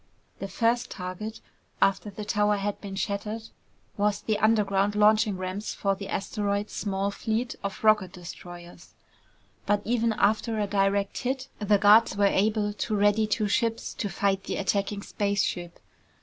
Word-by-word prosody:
The 195 - -4
first 230 +5 0
target, 185 +4 -6 0.4
after 195 +2 +2
the 205 +1 -7
tower 210 0 +2
had 200 +1 -3
been 195 -2 -6
shattered, 210 +3 -3 0.5
was 205 0 +1
the 215 -2 -1
underground 205 -2 +2
launching 210 -1 +4
ramps 185 +3 -4
for 195 -1 +1
the 195 0 -7
asteroid's 205 +1 -2
small 200 -1 -1
fleet 225 +4 -2
of 200 +1 -5
rocket 210 -4 +4
destroyers. 175 -1 -11 0.7
But 205 0 +2
even 230 -1 +1
after 220 +2 +1
a 210 - +1
direct 200 0 0
hit, 260 +1 -3
the 210 -1 +3
guards 205 0 +5
were 205 - +4
able 210 +1 +2
to 215 +1 -2
ready 205 +1 +3
two 210 0 0
ships 225 +2 0
to 205 - -3
fight 195 -1 0
the - - -3
attacking 200 +1 -1
spaceship. 195 -4 -1
205 Hz, 150 wpm, -27 LUFS, 195-215 Hz, 0.7 s, guards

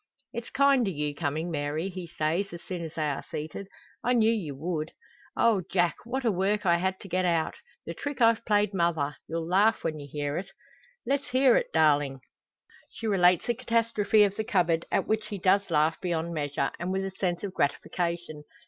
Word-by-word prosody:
"It's 235 - -5
kind 275 -4 +3
o' - - +1
you 150 -4 -2
comin', 155 +3 -2
Mary," 150 +3 -2
he 185 -2 -7
says, 165 +6 -1
as 170 - -8
soon 180 -2 -5
as 160 0 -7
they 155 -2 0
are 145 - -2
seated. 160 +6 -6 0.4
"I 245 - +2
knew 225 -2 +4
ye 200 -10 -2
would." 155 +2 -4 0.4
"O 225 -5 +4
Jack! 175 -2 +1
What 260 +2 -3
a 230 - +4
work 200 +2 0
I 170 -1 +4
had 190 +2 -1
to - - -9
get 185 0 0
out 170 -3 +1 0.3
the - - -4
trick 285 -1 -5
I've 230 -1 +4
played 210 -2 +2
mother! 165 -5 0
You'll 165 0 -3
laugh 205 +5 +3
when 155 -1 -2
you 145 -1 -9
hear 145 0 -2
it." 190 - -8 0.6
"Let's 280 +1 0
hear 255 -1 +5
it, - - +1
darling!" 145 -4 +2 0.7
She 230 - -8
relates 180 -4 +4
the 240 - +1
catastrophe 225 -2 +2
of 200 -1 0
the 220 - 0
cupboard, 175 -7 +1
at - - +1
which 220 0 -1
he 205 - -5
does 195 +2 +2
laugh 155 0 +2
beyond 170 -2 -2
measure, 145 -3 -1
and 175 +2 -2
with 190 0 -1
a 195 - -4
sense 180 -2 -2
of 195 -2 -4
gratification. 170 +1 -2
180 Hz, 200 wpm, -28 LUFS, 160-210 Hz, 0.7 s, hear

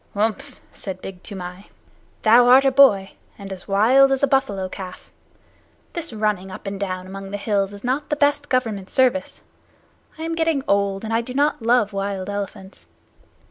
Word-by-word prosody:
"Umph!" 215 +1 -2
said 190 -2 -7
Big 185 -1 -9
Toomai. 185 -1 -8 0.6
"Thou 240 +3 +6
art 260 +2 +7
a 270 - +4
boy, 230 -8 +5 0.3
and 195 -1 -7
as 185 - -11
wild 245 +7 +5
as 270 +1 0
a - - +5
buffalo 210 -9 0
calf. 185 -1 -9 0.8
This 335 -4 -5
running 210 -4 -1
up 185 - -10
and 195 0 -5
down 185 -2 -3
among 195 +1 -8
the 205 - -4
hills 200 -1 0
is 205 0 -11
not 270 +4 -1
the 295 - +1
best 290 0 +1
Government 225 -7 -1
service. 260 +2 +1 0.8
I 320 - -6
am 330 0 -2
getting 325 -4 0
old, 200 0 +1
and 220 0 -3
I 225 - +2
do 250 +2 -8
not 290 -1 +1
love 225 -2 +2
wild 195 -1 -3
elephants. 200 -1 -7
210 Hz, 180 wpm, -22 LUFS, 195-265 Hz, 0.8 s, art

